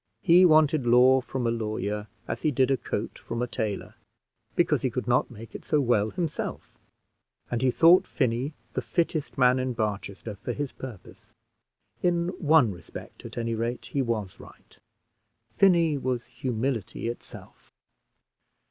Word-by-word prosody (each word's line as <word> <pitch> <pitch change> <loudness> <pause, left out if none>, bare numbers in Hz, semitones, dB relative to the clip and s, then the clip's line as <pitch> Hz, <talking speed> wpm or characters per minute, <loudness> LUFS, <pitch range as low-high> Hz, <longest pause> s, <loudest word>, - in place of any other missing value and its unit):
He 180 +1 +7
wanted 155 -4 +4
law 125 +2 +6
from 125 0 -4
a 115 - +2
lawyer 105 -2 -3 0.2
as - - -4
he 155 - +2
did 130 -1 +2
a - - +4
coat - - -4
from 115 - -5
a 125 - +1
tailor, 110 -3 -4 0.6
because 155 -6 +2
he 130 - 0
could 125 +1 -4
not 125 +1 +2
make 115 -2 -11
it - - -8
so 150 - +1
well 115 -5 +2
himself; 170 0 -4 0.8
and 120 -1 -1
he 130 - +3
thought 170 +7 +5
Finney 130 +2 -1 0.2
the - - -1
fittest 165 -3 -2
man 125 0 +4
in 130 -1 -1
Barchester 105 -1 -4
for 120 - -4
his 145 0 -4
purpose. 120 -8 -11 0.7
In 175 -1 +1
one 155 - +4
respect, 90 -2 -11
at - - -9
any 115 -1 -1
rate, 115 +2 -3
he 140 - +1
was 110 -7 -3
right: - - -16 0.8
Finney 170 -6 +4
was 125 -2 -2
humility 120 -3 -3
itself. 120 - -9
125 Hz, 155 wpm, -27 LUFS, 115-145 Hz, 0.8 s, He